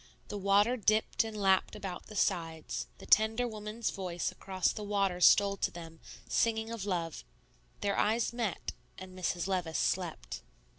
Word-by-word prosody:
The 205 - -4
water 200 +5 +4
dipped 215 0 +2
and 220 -1 -6
lapped 195 0 +2
about 195 -4 -6
the 215 - -10
sides; 165 -5 -1
the - - -12
tender 220 +3 +4
woman's 215 +1 -3
voice 175 -3 -3
across 190 -2 -1
the - - -6
water 200 -3 0
stole 200 +2 +6
to - - 0
them, 165 -1 -10 0.3
singing 225 -1 +1
of 215 -3 -4
love; 170 - -2 0.6
their 200 -1 +1
eyes 225 +2 +1
met 230 -7 -2 0.3
and 185 -1 -10
Mrs. 180 -1 -1
Levice 180 -5 -1
slept. 170 - -2
200 Hz, 155 wpm, -32 LUFS, 180-215 Hz, 0.6 s, stole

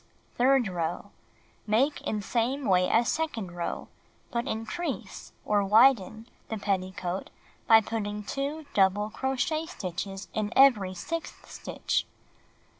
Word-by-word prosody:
Third 255 -1 +3
row: 175 +2 -3 0.6
Make 255 +8 +2
in 210 -1 -2
same 250 +6 -1
way 180 -2 +3
as 235 +1 +3
second 295 - -2
row, 170 -1 -4 0.4
but 235 +2 -2
increase, 225 +10 -4
or 205 -1 +2
widen, 220 0 +4 0.2
the 220 - -2
petticoat 190 -2 -2 0.4
by 225 -1 +8
putting 210 -1 -3
2 285 +7 -3
double 205 +2 +2
crochet 270 +6 -1
stitches 195 - -5
in 215 0 -1
every 215 -9 +5
sixth 330 - -5
stitch. - - -2
220 Hz, 115 wpm, -28 LUFS, 195-265 Hz, 0.6 s, by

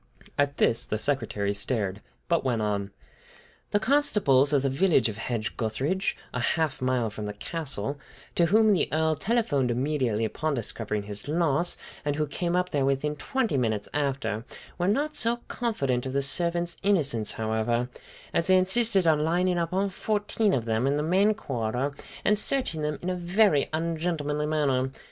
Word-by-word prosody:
At 145 0 0
this, 115 +1 +3
the 105 - -2
secretary 110 -5 0
stared, 100 -2 -2 0.3
but 170 -1 +1
went 125 -4 0
on: 100 -2 -1 0.8
"The 205 - +2
constables 210 - +3
from 145 -2 +3
the 140 - +1
village 135 - +3
of 105 - -6
Hedge 110 -6 -3
gutheridge, 135 - -1 0.2
a 125 - -2
half 145 +2 0
a - - -3
mile 125 -4 +1
from 105 0 -5
the 105 - -4
castle, 140 0 -2 0.3
to 170 - +3
whom 215 +3 +5
the 185 - +1
Earl 160 0 +2
telephoned 205 - +1
immediately 125 -3 0
upon 155 +7 -2
discovering 105 -3 -3
his 105 +3 -5
loss, 165 +1 +2 0.3
and 145 0 -1
who 155 0 0
came 170 +4 -2
up 180 0 0
there 140 -2 +1
within 140 +2 0
twenty 225 - -1
minutes 110 -4 0
after, 135 -7 -1 0.4
were 175 - +1
not 290 +9 +1
so 235 +1 +2
confident 135 - -1
of 130 - -5
the 140 0 +1
servants' 170 +5 -1
innocence, 140 - +1
however, 110 +2 0 0.5
as 165 - +1
they 185 0 +6
insisted 195 +1 +2
on 160 -2 +4
lining 175 +2 +1
up 165 -1 -1
all 195 +2 +1
fourteen 210 +2 0
of 120 -10 0
them 115 +3 +1
in 140 - +2
the 150 - 0
main 195 +6 +3
corridor 125 - -2 0.3
and 210 0 +5
searching 215 - 0
them 150 -1 -1
in 180 - -1
a - - -1
very 180 -3 +2
ungentlemanly 155 -2 -1
manner! 135 -4 +1
145 Hz, 175 wpm, -27 LUFS, 120-180 Hz, 0.8 s, they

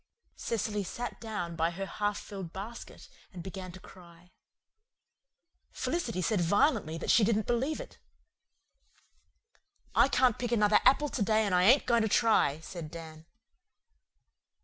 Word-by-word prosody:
Cecily 210 -2 -2
sat 240 +6 -6
down 205 -7 -4
by 165 0 +1
her 190 +3 -5
half 205 +1 -2
filled 190 -5 -8
basket 210 +6 -9 0.2
and 180 -4 -9
began 190 -1 -7
to 185 - -12
cry. 175 -1 -17 1.4
Felicity 260 - -3
said 210 0 +1
violently 200 - +1
that - - -1
she 230 - +5
didn't 215 0 +1
believe 255 +6 -1
it. - - -10 1.9
"I - - +5
can't 255 -3 +2
pick 240 -1 -3
another 210 -2 +4
apple 295 +2 +4
to 255 - -4
day 215 +1 +2
and 200 - -1
I 180 0 +4
ain't 260 +7 +5
going 235 -1 +3
to 220 - 0
try," 215 -10 +3
said 160 -1 -8
Dan. 160 -1 -10
205 Hz, 145 wpm, -30 LUFS, 175-230 Hz, 1.9 s, she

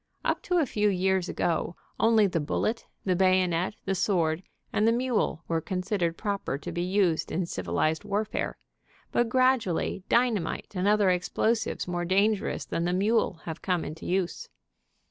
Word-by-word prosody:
Up - - +1
to 360 - 0
a 325 - +3
few 210 -4 +1
years 190 -1 +1
ago 170 +1 -1 0.2
only 225 -2 +5
the 180 -4 0
bullet, 215 +9 -1 0.2
the 185 -2 +2
bayonet, 185 0 +2
the 195 - 0
sword 175 -4 +1 0.3
and 210 +2 +3
the - - +5
mule 235 -8 0
were 165 -1 0
considered 180 -1 -1
proper 200 -9 -2
to - - -7
be 175 - -2
used 180 -2 +1
in 180 +1 0
civilized 125 - -1
warfare, 205 +1 -2 0.5
but 240 -1 +2
gradually 255 -8 +2
dynamite 235 -7 +1
and 185 0 0
other 205 -2 +4
explosives 215 +6 0
more 175 -1 -2
dangerous 200 +4 +1
than 170 - -2
the 175 - 0
mule 200 -2 +1
have 160 -1 -6
come 180 -3 0
into 160 +1 -7
use. 185 -1 -1
185 Hz, 160 wpm, -28 LUFS, 170-210 Hz, 0.5 s, only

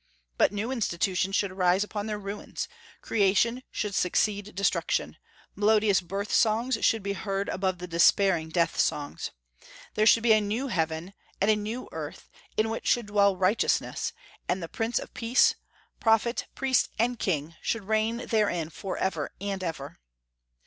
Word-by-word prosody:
But - - +3
new 210 +4 -3
institutions 195 -4 0
should 200 -2 +1
arise 185 +1 +2
upon 210 0 -4
their 210 -1 -2
ruins; 205 0 -5 0.4
creation 225 +4 +2
should 210 -2 -3
succeed 205 +2 0
destruction; 200 +1 0 0.4
melodious 210 -1 +3
birth 195 +4 -4
songs 230 +4 +3
should 225 -3 +2
be 200 0 -1
heard 195 +1 -3
above 185 -1 -1
the 180 - -6
despairing 170 0 +3
death 170 +1 0
songs. 145 -1 -1 0.6
There 215 0 +2
should 230 - +6
be 230 -2 +6
a 215 - +4
new 225 +7 -2
heaven 165 0 -2 0.3
and 205 +2 +4
a - - +4
new 215 +4 -4
earth, - - -7 0.3
in 220 +1 +2
which 225 - -4
should 240 -2 +2
dwell 200 -2 +3
righteousness; 190 +4 +1 0.4
and 180 0 0
the - - -4
Prince 225 +7 -2
of - - -5
Peace 240 +2 +3 0.5
Prophet, 225 +1 +2
Priest, 265 -1 +2
and 235 +1 0
King 160 -3 -1
should 225 -2 -2
reign 220 +3 0
therein 200 -8 0
forever 185 -4 -3
and 195 -1 -3
ever. 155 -5 -5
200 Hz, 155 wpm, -27 LUFS, 185-220 Hz, 0.6 s, should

